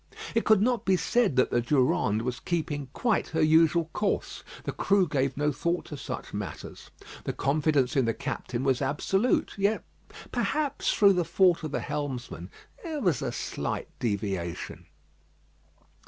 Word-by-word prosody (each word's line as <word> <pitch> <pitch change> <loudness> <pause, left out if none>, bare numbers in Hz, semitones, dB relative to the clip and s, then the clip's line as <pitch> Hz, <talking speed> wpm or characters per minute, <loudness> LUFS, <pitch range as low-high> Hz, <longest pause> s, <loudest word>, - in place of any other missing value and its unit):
It 230 - +1
could 215 -2 +5
not 245 0 +1
be 190 -1 +3
said 190 - +1
that 130 - +3
the 120 - +2
Durande 120 -4 +2
was 125 0 -3
keeping 150 -5 -2
quite 230 - 0
her 160 0 -1
usual 160 +1 +4
course. 210 -1 -2 0.2
The - - -2
crew 195 -2 +2
gave 135 -2 0
no 150 +1 +1
thought 170 +5 -1
to 150 - -7
such 140 - -6
matters. 100 -7 -7 0.4
The - - -2
confidence 140 -2 +1
in 135 -3 +3
the 115 - +1
captain 120 +1 -4
was 135 -1 +1
absolute; 190 - +1
yet, 205 +2 +1 0.5
perhaps 300 -2 0
through 200 -2 +5
the 180 -1 +1
fault 175 +1 +3
of 155 - -4
the - - -2
helmsman, 135 - -4 0.3
there 320 -3 -3
was 175 - +1
a 130 -3 -2
slight - - -4
deviation. 95 -6 -3
150 Hz, 155 wpm, -28 LUFS, 130-190 Hz, 0.5 s, could